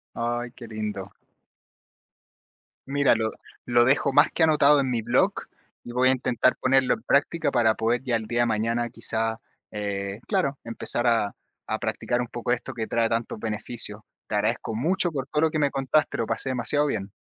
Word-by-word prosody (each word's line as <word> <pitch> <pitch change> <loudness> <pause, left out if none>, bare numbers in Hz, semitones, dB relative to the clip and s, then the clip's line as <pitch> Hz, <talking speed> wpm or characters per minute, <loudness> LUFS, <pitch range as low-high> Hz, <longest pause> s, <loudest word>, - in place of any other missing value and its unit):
Ay, 120 +1 -2
qué 120 - -10
lindo. 105 -3 -5 1.8
Mira, 140 0 +3
lo 110 0 -1 0.4
lo 120 -1 +4
dejo 135 +1 +2
más 145 - +6
que 165 - +2
anotado 150 -2 +5
en 130 -2 -1
mi 115 -2 -1
blog, - - +2 0.5
y 120 - -8
voy 130 +1 +3
a - - +5
intentar 125 -1 +1
ponerlo 130 0 +2
en 110 - -11
práctica 150 +5 +1
para 115 -3 +3
poder 120 +3 0
ya 125 -3 0
el 110 - -3
día 120 +2 -1
de 120 - +3
mañana 115 +2 0
quizá, 110 -1 -1 0.3
eh, 100 0 -4
claro, 140 0 0
empezar 120 +1 +1
a 115 -4 +2 0.3
a - - -2
practicar 120 0 -1
un 120 - -6
poco 120 0 -5
esto 125 - -3
que 110 -2 -4
trae 115 -1 +1
tantos 115 -1 -2
beneficios. 105 0 -3 0.3
Te 105 - -2
agradezco 110 +1 -1
mucho 175 - 0
por 135 -3 -3
todo 150 +1 -1
lo 160 - +3
que 155 - -2
me 145 -2 +2
contaste, 135 +3 0
lo 115 - -1
pasé 115 +4 -2
demasiado 140 +4 +2
bien. 100 -7 -3
120 Hz, 190 wpm, -25 LUFS, 110-135 Hz, 1.8 s, más